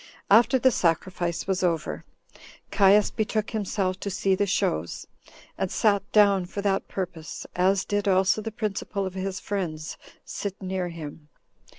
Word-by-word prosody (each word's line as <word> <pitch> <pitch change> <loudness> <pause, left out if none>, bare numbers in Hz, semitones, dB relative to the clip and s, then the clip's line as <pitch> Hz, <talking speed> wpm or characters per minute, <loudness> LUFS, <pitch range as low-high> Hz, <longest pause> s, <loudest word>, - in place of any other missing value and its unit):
After 235 +5 +6
the 260 +1 +4
sacrifice 170 -1 0
was 190 -1 0
over, 165 -4 -1 0.7
Caius 200 0 +5
betook 215 -1 -1
himself 195 -3 -1
to 200 - -4
see 195 0 +1
the 200 +2 +1
shows, 80 - -1 0.5
and 190 - 0
sat 205 -2 +3
down 200 -4 +4
for 200 +2 -5
that 195 -1 0
purpose, 175 -4 -5
as 190 +2 +2
did 205 0 -1
also 190 +2 +3
the 225 +1 -5
principal 205 -2 -3
of 190 - -4
his 190 0 -3
friends 165 -6 -4 0.3
sit 200 -2 -5
near 185 -2 -3
him. 155 -2 -9
195 Hz, 150 wpm, -26 LUFS, 180-205 Hz, 0.7 s, After